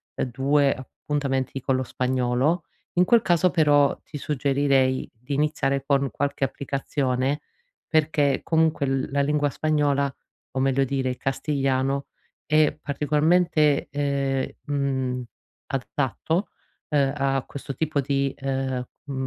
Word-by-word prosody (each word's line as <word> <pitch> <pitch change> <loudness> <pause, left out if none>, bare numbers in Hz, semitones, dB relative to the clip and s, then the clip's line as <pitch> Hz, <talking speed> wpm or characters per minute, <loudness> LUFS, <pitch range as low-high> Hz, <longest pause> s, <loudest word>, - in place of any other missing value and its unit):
uhm, - - -1
2 140 +3 +3
appuntamenti 135 0 -3
con 135 0 +1
lo 130 - -1
spagnolo. 130 +6 0 0.3
In 180 - +6
quel 235 +4 +5
caso 175 0 +3
però, 145 -4 +4
ti 150 - -8
suggerirei 135 -2 +1
di 125 +5 -7
iniziare 140 -2 0
con 140 -1 +2
qualche 140 0 -2
applicazione, 135 0 -1 0.5
perché 150 -3 +2
comunque 160 -3 +2
l 135 -1 0
la 140 - +2
lingua 145 0 +1
spagnola, 145 -2 +1 0.4
o 130 - -3
meglio 135 0 +2
dire 135 -1 -1
il 125 - -3
castigliano, 135 0 0 0.4
è 155 0 +3
particolarmente, 150 +1 +2
ehm, 140 -2 0 0.2
mhmm, 130 -3 -1 0.4
adatto, 145 - -1 0.4
uhm, 140 -3 +2
a 135 -2 0
questo 140 -1 -7
tipo 155 0 0
di, 140 0 0
uhm, 135 -2 -1 0.2
m 140 - -6
140 Hz, 125 wpm, -25 LUFS, 135-150 Hz, 0.5 s, In